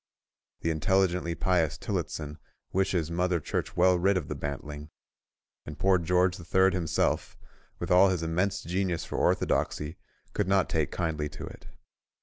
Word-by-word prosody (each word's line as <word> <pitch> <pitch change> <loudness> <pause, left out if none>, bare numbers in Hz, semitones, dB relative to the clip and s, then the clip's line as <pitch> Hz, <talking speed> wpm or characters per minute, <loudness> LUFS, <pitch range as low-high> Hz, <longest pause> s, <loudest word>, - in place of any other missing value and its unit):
The 80 - 0
intelligently 90 +1 +1
pious 85 -5 +1
Tillotson 75 -1 -4 0.3
wishes 90 -4 +1
Mother 90 0 +1
Church - - -3
well 90 -1 +5
rid 95 +2 +3
of 85 - -4
the - - -1
bantling; 75 +1 -6 0.7
and 75 - -8
poor 95 -1 +3
George 90 +1 +2
the 90 - -10
Third 95 +2 +3
himself, 85 -4 0 0.4
with 85 +1 -4
all 95 +2 +7
his 90 -3 -1
immense 90 +5 0
genius 90 -1 -1
for - - -3
orthodoxy, 75 +3 0 0.4
could 105 - 0
not 95 -1 +2
take - - 0
kindly 75 -4 -2
to - - -8
it. - - -11
90 Hz, 150 wpm, -28 LUFS, 80-95 Hz, 0.7 s, all